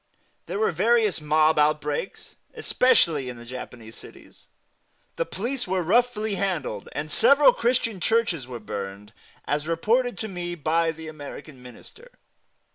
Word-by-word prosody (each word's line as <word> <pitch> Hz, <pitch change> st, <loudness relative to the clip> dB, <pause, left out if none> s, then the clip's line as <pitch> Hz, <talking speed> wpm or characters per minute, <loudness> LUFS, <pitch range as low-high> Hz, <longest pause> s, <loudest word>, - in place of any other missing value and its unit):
There -, -, -3 dB
were 440 Hz, +1 st, +2 dB
various 225 Hz, -7 st, +2 dB
mob 155 Hz, +1 st, +3 dB
outbreaks, 150 Hz, +3 st, -1 dB, 0.2 s
especially 165 Hz, -, +3 dB
in 125 Hz, -, -8 dB
the 120 Hz, -, -11 dB
Japanese 120 Hz, -2 st, -9 dB
cities; -, -, -15 dB, 0.7 s
the 165 Hz, -, -2 dB
police 240 Hz, +8 st, -3 dB
were 185 Hz, -1 st, 0 dB
roughly 220 Hz, +2 st, +1 dB
handled, 170 Hz, -, -3 dB
and 150 Hz, +1 st, -4 dB
several 280 Hz, -, +6 dB
Christian 230 Hz, -4 st, 0 dB
churches 180 Hz, -, +1 dB
were 125 Hz, -2 st, -7 dB
burned, 105 Hz, 0 st, -7 dB, 0.3 s
as 145 Hz, +1 st, -2 dB
reported 220 Hz, +7 st, +1 dB
to 220 Hz, -, -4 dB
me 175 Hz, -3 st, -5 dB
by 165 Hz, +1 st, +1 dB
the 160 Hz, 0 st, -10 dB
American 145 Hz, -2 st, -10 dB
Minister. 440 Hz, -, -14 dB
165 Hz, 135 wpm, -25 LUFS, 145-220 Hz, 0.7 s, several